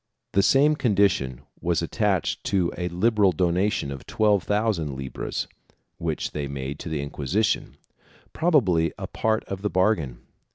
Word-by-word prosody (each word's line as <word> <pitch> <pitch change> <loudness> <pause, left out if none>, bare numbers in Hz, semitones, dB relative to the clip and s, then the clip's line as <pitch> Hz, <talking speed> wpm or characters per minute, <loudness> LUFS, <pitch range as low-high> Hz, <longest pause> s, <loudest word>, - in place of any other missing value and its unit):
The 100 - +4
same 145 +8 +4
condition 100 - +1 0.2
was 85 -1 +1
attached 95 0 0
to 90 -4 +1
a 90 - -2
liberal 100 +2 +3
dona 90 +4 +2
tion 70 -8 -3
of 70 -1 -8
twelve 105 -3 +3
thousand 100 -7 0
libras 65 0 -4 0.5
which 80 -2 -2
they 75 -2 -3
made 70 +1 -5
to - - -6
the 75 -3 -2
Inquisition 85 - -1 0.3
— - - -29
probably 95 - +3
a - - -5
part 110 0 0
of 95 -1 -6
the 105 - 0
bargain. 85 - +1
90 Hz, 155 wpm, -25 LUFS, 75-105 Hz, 0.5 s, The